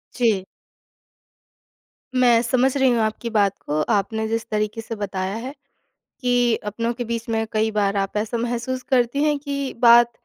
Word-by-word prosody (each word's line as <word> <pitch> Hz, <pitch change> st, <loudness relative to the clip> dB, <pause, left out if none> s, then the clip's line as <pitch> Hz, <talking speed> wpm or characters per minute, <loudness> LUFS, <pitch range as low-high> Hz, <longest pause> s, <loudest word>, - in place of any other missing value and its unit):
जी। 220 Hz, -6 st, +1 dB, 1.7 s
मैं 240 Hz, -2 st, +5 dB
समझ 255 Hz, +3 st, +1 dB
रही 265 Hz, -1 st, +4 dB
हूँ 240 Hz, -1 st, +2 dB
आपकी 220 Hz, +2 st, -2 dB
बात 200 Hz, -3 st, +1 dB
को 150 Hz, +1 st, 0 dB
आपने 220 Hz, +2 st, 0 dB
जिस 225 Hz, 0 st, -2 dB
तरीक़े 215 Hz, +1 st, -2 dB
से 225 Hz, 0 st, -6 dB
बताया 195 Hz, -1 st, -3 dB
है, 255 Hz, +5 st, -6 dB, 0.7 s
कि 245 Hz, -2 st, +2 dB
अपनों 230 Hz, +3 st, -2 dB
के 245 Hz, +1 st, -4 dB
बीच 230 Hz, 0 st, -4 dB
में 225 Hz, 0 st, 0 dB
कई 220 Hz, 0 st, +1 dB
बार 205 Hz, -1 st, 0 dB
आप 195 Hz, +1 st, -1 dB
ऐसा 220 Hz, +2 st, -1 dB
महसूस 245 Hz, +2 st, -2 dB
करतीं 260 Hz, +2 st, +2 dB
हैं 295 Hz, -1 st, +2 dB
कि 280 Hz, -2 st, -4 dB
बात 235 Hz, 0 st, +7 dB
230 Hz, 165 wpm, -22 LUFS, 215-245 Hz, 1.7 s, बात